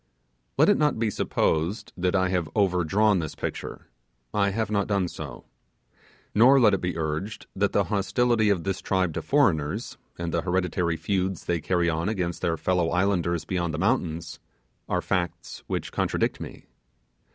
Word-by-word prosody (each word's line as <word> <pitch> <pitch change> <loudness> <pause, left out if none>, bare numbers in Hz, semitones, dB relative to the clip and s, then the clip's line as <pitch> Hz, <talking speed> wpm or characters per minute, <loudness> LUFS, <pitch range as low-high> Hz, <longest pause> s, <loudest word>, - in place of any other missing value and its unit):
Let - - +5
it 205 - +4
not 150 -4 +2
be 110 -1 0
supposed 95 +5 -1
that 90 +1 0
I 95 -1 +2
have 90 -4 -1
overdrawn 100 +1 +3
this 80 -3 -4
picture. - - -5 0.5
I 100 -1 +2
have 110 +1 -2
not 100 -2 +1
done 100 -3 +1
so. 70 -7 -8 0.9
Nor 125 +6 +6
let 110 -5 +5
it 95 - 0
be 90 -2 -2
urged, 80 +6 -3
that 100 +1 +1
the 100 - +2
hostility 110 +2 +1
of 95 -5 +1
this 95 -1 -2
tribe 95 -3 0
to - - -3
foreigners, 85 - +1 0.2
and 85 -1 -4
the 85 - +1
hereditary 90 -2 0
feuds 95 -2 -2
they 85 -2 0
carry 90 +1 +1
on 85 +3 0
against 90 -5 -2
their 80 -1 0
fellow 90 0 +1
islanders 85 -2 0
beyond 85 -4 -2
the - - -4
mountains, 85 -5 -1 0.5
are - - 0
facts 90 -4 -3
which - - -3
contradict - - 0
me. - - -9
90 Hz, 165 wpm, -26 LUFS, 85-100 Hz, 0.9 s, Nor